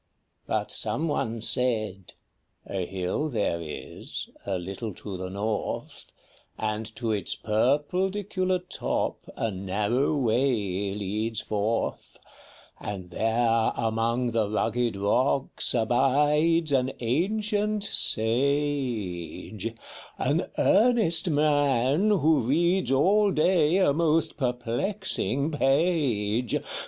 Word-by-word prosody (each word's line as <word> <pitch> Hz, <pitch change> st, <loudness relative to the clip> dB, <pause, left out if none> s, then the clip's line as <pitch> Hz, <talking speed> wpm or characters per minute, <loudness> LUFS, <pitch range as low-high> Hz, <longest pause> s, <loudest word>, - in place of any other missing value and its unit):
But -, -, -1 dB
some 165 Hz, -, -1 dB
one 115 Hz, -6 st, -2 dB
said, 110 Hz, -7 st, -1 dB, 0.3 s
" -, -, -48 dB, 0.2 s
A 95 Hz, -3 st, -3 dB
hill 95 Hz, +11 st, -2 dB
there 100 Hz, -, -1 dB
is, 75 Hz, -2 st, -7 dB, 0.2 s
a 95 Hz, -2 st, 0 dB
little 95 Hz, +3 st, -6 dB
to 100 Hz, +1 st, -7 dB
the 95 Hz, 0 st, -5 dB
north, 105 Hz, +3 st, -4 dB, 0.5 s
And 110 Hz, 0 st, -2 dB
to 115 Hz, -2 st, -2 dB
its 105 Hz, 0 st, 0 dB
purpledicular 180 Hz, -, 0 dB
top -, -, -3 dB
a 115 Hz, -, -1 dB
narrow 105 Hz, +10 st, 0 dB
way 110 Hz, -6 st, 0 dB
leads 105 Hz, +3 st, -2 dB
forth; 105 Hz, +2 st, -2 dB, 0.6 s
And 95 Hz, -3 st, -6 dB
there 115 Hz, +2 st, +1 dB
among 115 Hz, +2 st, 0 dB
the 110 Hz, -3 st, 0 dB
rugged 115 Hz, +1 st, 0 dB
rocks 125 Hz, +8 st, +1 dB
abides 145 Hz, +7 st, +2 dB
an 130 Hz, -1 st, +1 dB
ancient 205 Hz, -, 0 dB
Sage, 115 Hz, -, -1 dB
â 115 Hz, 0 st, -3 dB, 0.4 s
An 145 Hz, +7 st, 0 dB
earnest 200 Hz, -6 st, +4 dB
Man, 145 Hz, -, +2 dB
who 160 Hz, -6 st, +3 dB
reads 170 Hz, +7 st, +1 dB
all 200 Hz, +10 st, +4 dB
day 170 Hz, -1 st, +3 dB
a 185 Hz, -7 st, +3 dB
most 165 Hz, +1 st, +1 dB
perplexing 135 Hz, -, -1 dB
page. 135 Hz, -, +1 dB
125 Hz, 105 wpm, -26 LUFS, 110-155 Hz, 0.6 s, earnest